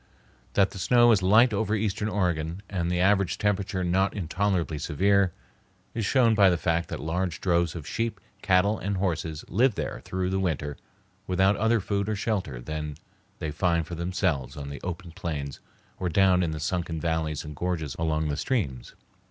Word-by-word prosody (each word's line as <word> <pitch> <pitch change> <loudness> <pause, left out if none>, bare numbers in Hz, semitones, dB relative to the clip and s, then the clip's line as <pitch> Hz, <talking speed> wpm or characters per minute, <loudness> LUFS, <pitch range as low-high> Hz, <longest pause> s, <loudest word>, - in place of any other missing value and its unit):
That 100 -1 +3
the 95 - -8
snow 120 +3 +5
is 105 -4 +4
light 110 +6 +5
over 105 +1 0
eastern 105 0 -1
Oregon, 90 -2 -1
and 85 -4 -2
the 90 0 0
average 100 -2 +3
temperature 100 -2 0
not 95 +3 +1
intolerably 90 -3 -1
severe, 95 +5 +2 0.6
is 115 -3 -1
shown 120 -3 +4
by 100 -3 +6
the 90 - +2
fact 85 0 0
that - - -4
large 85 +1 -2
droves 85 -2 +1
of 80 -4 -6
sheep, 115 0 -2 0.2
cattle, 100 +3 +3
and 100 0 -2
horses 85 -4 -2
live 120 +4 +2
there - - -4
through 95 0 -2
the 95 - 0
winter 80 -6 -1 0.5
without 95 +2 +3
other 115 +2 +2
food 100 +1 -1
or 110 - 0
shelter 95 - -2
than 75 +3 -5 0.4
they 80 - -4
find 85 +1 +1
for 85 - -8
themselves 85 -6 -1
on 70 -1 -6
the 70 - -7
open 90 -1 -5
plains 75 -4 -5 0.4
or 90 - -1
down 95 +1 +4
in 85 - +1
the 80 -1 -4
sunken 85 0 -2
valleys 80 -2 -1
and 75 0 -7
gorges 80 -4 -2
along 80 -1 0
the 70 -1 -2
streams. 70 - -2
90 Hz, 180 wpm, -27 LUFS, 80-100 Hz, 0.6 s, by